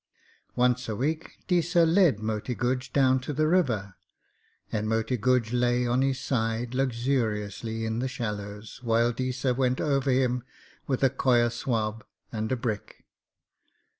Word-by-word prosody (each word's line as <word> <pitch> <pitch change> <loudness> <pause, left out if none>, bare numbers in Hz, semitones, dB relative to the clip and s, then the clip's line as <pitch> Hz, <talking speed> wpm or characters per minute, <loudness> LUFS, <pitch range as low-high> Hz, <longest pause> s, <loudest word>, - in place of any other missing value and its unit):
Once 125 -1 +2
a 110 - -2
week 155 +7 -2
Deesa 175 -2 +3
led 165 - +4
Moti 110 +3 -3
Guj 125 +2 -1
down 130 -2 +4
to 130 +4 -5
the 155 +2 +2
river, 120 - +1 0.8
and 110 0 -1
Moti 115 +2 0
Guj 125 0 +1
lay 125 0 +2
on 120 +2 +2
his 135 -1 +1
side 115 -2 -1
luxuriously 115 -4 -1
in 110 +1 -2
the 130 - -1
shallows, 105 -4 -5
while 115 0 +2
Deesa 130 +1 -1
went 130 -1 +1
over 140 -2 +1
him 125 -1 +2 0.5
with 135 -1 -1
a 135 - +5
coir 120 -3 +3
swab 115 -2 -2 0.3
and 110 0 -3
a - - +3
brick. 115 -4 -5
125 Hz, 145 wpm, -27 LUFS, 110-130 Hz, 0.8 s, a